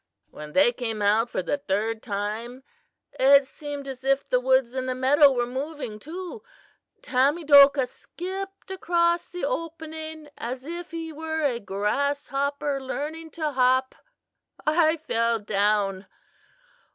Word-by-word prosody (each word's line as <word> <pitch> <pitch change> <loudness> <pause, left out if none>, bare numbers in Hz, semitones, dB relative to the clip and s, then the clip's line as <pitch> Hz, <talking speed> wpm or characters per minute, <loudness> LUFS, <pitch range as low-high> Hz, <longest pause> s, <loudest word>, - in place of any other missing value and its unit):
"When 150 0 -10
they 265 -4 +5
came 225 -3 -4
out 215 +3 +2
for 185 - -2
the 285 +10 -1
third 220 -1 -1
time 220 +4 -4 0.6
it 275 +1 +6
seemed 285 0 -7
as 265 -1 -7
if 275 +1 +1
the 250 - +2
woods 260 -1 +2
and 260 0 -3
the 255 - -1
meadow 280 +3 +5
were 245 -2 0
moving 260 -3 -5
too. 360 - -7 0.6
Tamedokah 280 0 +5
skipped 380 +8 -8
across 345 -2 +1
the 355 - -4
opening 315 -5 -5
as 255 +3 -5
if 345 +2 -6
he 325 -1 -6
were 315 +1 -3
a 250 -5 +1
grasshopper 275 +7 -1
learning 310 +5 -5
to 310 -2 -1
hop. 260 0 +2 0.7
I 315 +1 +3
fell 230 -6 0
down. 200 -2 0
275 Hz, 130 wpm, -25 LUFS, 240-315 Hz, 0.7 s, it